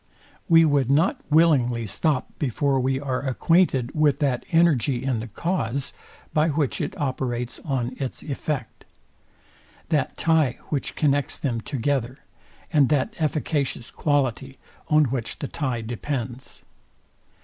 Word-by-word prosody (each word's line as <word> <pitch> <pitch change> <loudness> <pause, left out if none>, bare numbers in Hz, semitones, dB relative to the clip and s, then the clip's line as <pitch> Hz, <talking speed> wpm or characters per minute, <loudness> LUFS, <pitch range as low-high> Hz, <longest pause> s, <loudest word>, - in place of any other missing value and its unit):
We 165 -1 +7
would 140 -4 +2
not 155 +7 +2
willingly 135 -7 +3
stop 140 +5 0
before 135 0 +1
we 130 +1 0
are 130 -2 -2
acquainted 135 -1 +2
with 150 -3 +3
that 135 -4 0
energy 145 -7 +3
in 130 -4 0
the 115 - -5
cause, 140 - -2 0.4
by 155 +1 +3
which 145 -3 0
it - - -4
operates 125 -3 -2
on 130 -4 -2
its 135 -3 -4
effect; 140 -3 -4 1.0
that 150 -5 0
tie, 160 -6 +2
which 145 -3 -2
connects 145 -2 +1
them 120 -5 -2
together; 130 0 -2 0.6
and 145 -4 +5
that 145 -4 +1
efficacious 150 -5 -1
quality, 135 -2 -1 0.3
on 155 -1 +4
which 120 -2 -3
the 140 - -4
tie 130 -7 -2
depends. 120 +2 -5
135 Hz, 125 wpm, -24 LUFS, 125-150 Hz, 1.0 s, We